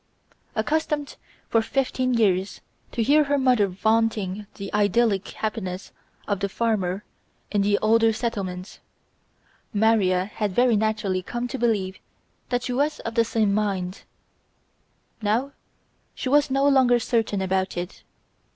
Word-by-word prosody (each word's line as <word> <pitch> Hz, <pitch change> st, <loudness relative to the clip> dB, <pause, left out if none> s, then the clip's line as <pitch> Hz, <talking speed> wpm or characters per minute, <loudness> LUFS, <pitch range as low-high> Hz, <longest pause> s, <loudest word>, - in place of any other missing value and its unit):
Accustomed 295 Hz, +4 st, -1 dB, 0.3 s
for 225 Hz, -, +3 dB
fifteen 255 Hz, +1 st, 0 dB
years 195 Hz, -4 st, +1 dB, 0.3 s
to 230 Hz, -, 0 dB
hear 295 Hz, +5 st, +4 dB
her 285 Hz, 0 st, +1 dB
mother 250 Hz, -6 st, +3 dB
vaunting 210 Hz, 0 st, 0 dB
the 200 Hz, -2 st, -7 dB
idyllic 205 Hz, 0 st, +2 dB
happiness 195 Hz, -4 st, -4 dB, 0.4 s
of 200 Hz, -2 st, 0 dB
the 200 Hz, -1 st, -1 dB
farmer 200 Hz, -3 st, -1 dB, 0.5 s
in 205 Hz, -, +2 dB
the 205 Hz, 0 st, +3 dB
older 225 Hz, +1 st, +4 dB
settlements, 200 Hz, -5 st, -4 dB, 1.0 s
Maria 200 Hz, -4 st, +3 dB
had 210 Hz, -2 st, -3 dB
very 245 Hz, -2 st, +4 dB
naturally 210 Hz, -3 st, 0 dB
come 240 Hz, +6 st, -4 dB
to 265 Hz, -, -4 dB
believe 205 Hz, -5 st, 0 dB, 0.5 s
that 245 Hz, -1 st, 0 dB
she 250 Hz, -, -2 dB
was 290 Hz, +4 st, 0 dB
of 230 Hz, -, -5 dB
the 230 Hz, 0 st, +4 dB
same 220 Hz, -3 st, +1 dB
mind; 195 Hz, -3 st, -1 dB, 1.2 s
now 225 Hz, +6 st, 0 dB, 0.6 s
she 255 Hz, -, -3 dB
was 290 Hz, +1 st, +4 dB
no 275 Hz, +1 st, +2 dB
longer 260 Hz, -3 st, +5 dB
certain 225 Hz, -4 st, 0 dB
about 190 Hz, -1 st, -1 dB
it. 175 Hz, +2 st, -5 dB
220 Hz, 135 wpm, -24 LUFS, 195-245 Hz, 1.2 s, longer